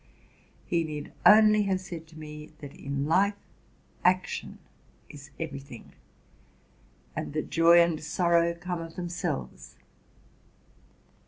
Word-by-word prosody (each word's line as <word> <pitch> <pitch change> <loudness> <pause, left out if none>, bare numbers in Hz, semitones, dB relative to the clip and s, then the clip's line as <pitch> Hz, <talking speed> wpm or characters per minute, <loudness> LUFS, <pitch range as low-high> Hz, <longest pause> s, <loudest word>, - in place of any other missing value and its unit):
He 170 -1 0
need 150 -2 -6
only" 215 0 +7
have 190 -1 0
said 170 -3 -8
to 160 0 -15
me 150 0 -10
that 145 -1 -10
in 140 -1 -4
life 195 +6 +3 0.7
action 185 0 0 0.5
is 145 0 -12
every 160 -4 -4
thing, 135 -4 -13 1.2
and - - -4
that 155 - -3
joy 170 +1 +6
and 170 -2 +2
sorrow 170 +1 +2
come 175 0 -4
of 165 0 -9
themselves. 170 - -5
165 Hz, 115 wpm, -28 LUFS, 150-175 Hz, 1.2 s, only